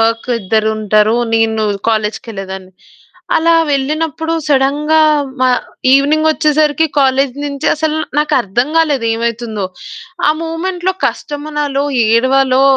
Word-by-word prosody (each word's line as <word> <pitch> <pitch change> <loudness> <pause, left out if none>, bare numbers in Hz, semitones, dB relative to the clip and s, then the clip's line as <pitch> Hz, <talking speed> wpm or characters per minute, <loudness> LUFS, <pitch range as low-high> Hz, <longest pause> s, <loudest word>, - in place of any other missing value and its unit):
Work 225 +2 0
ఇద్దరుంటారు, 215 +1 +1 0.2
నేను 225 -1 +1 0.3
కాలేజుకెళ్ళేదాన్ని. 210 -4 -4 0.6
అలా 335 +1 +3 0.2
వెళ్ళినప్పుడు 310 +3 -1
సడెన్‌గా 295 +3 +2 0.4
మా 255 - +4 0.4
ఈవెనింగొచ్చేసరికి 305 +1 +2
కాలేజు 270 -1 +1
నుంచి 280 +1 -4
అసలు 310 0 -1 0.2
నాకర్థం 260 -5 0
గాలేదు 290 -8 +2
ఏవైతుందో 230 -2 -3 0.6
ఆ! - - +5
మూమెంట్‌లో 355 +3 -2
కష్టమనాలో, 290 -1 -3 0.3
ఏడవాలో, 260 +2 +3
270 Hz, 90 wpm, -14 LUFS, 225-305 Hz, 0.6 s, ఆ